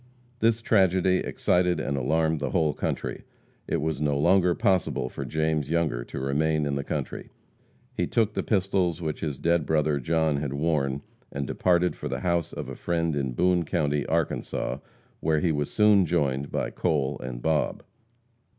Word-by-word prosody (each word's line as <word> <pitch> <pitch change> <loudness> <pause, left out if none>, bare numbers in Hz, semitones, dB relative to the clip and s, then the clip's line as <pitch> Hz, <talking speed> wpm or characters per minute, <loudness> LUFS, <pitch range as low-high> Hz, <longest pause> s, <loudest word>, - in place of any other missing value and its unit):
This 115 -1 +2
tragedy 95 -4 +3
excited 90 -2 +1
and 70 - -2
alarmed 80 +4 +1
the 70 - -2
whole 80 -4 +1
country. - - -3 0.4
It - - 0
was 80 -1 -2
no 75 -2 +1
longer 90 +4 +4
possible 90 -9 +1
for 70 - -6
James 80 +1 -1
Younger 80 -8 0
to - - -6
remain 75 +3 +1
in 70 - -1
the 70 0 -2
country. - - -4 0.6
He - - -1
took 110 -2 +1
the - - -1
pistols 95 -4 0
which 80 -3 -3
his 75 -4 -3
dead 85 +1 +2
brother, 75 -2 +2
John, 80 +1 +1
had 70 -1 -3
worn, 70 -2 0 0.3
and 70 0 -3
departed 90 +4 +1
for - - -5
the - - -3
house 85 -2 0
of - - -6
a - - -6
friend 85 -2 -1
in 65 -3 -1
Boone 90 +5 +2
county, 75 -4 0
Arkansas, 80 -2 -1 0.4
where 80 -1 +1
he 80 +2 +1
was 75 -1 -1
soon 105 -4 +4
joined 70 -4 0
by - - -2
Cole 75 -5 -1
and 65 -1 -5
Bob. 75 +3 0
80 Hz, 170 wpm, -26 LUFS, 70-90 Hz, 0.6 s, longer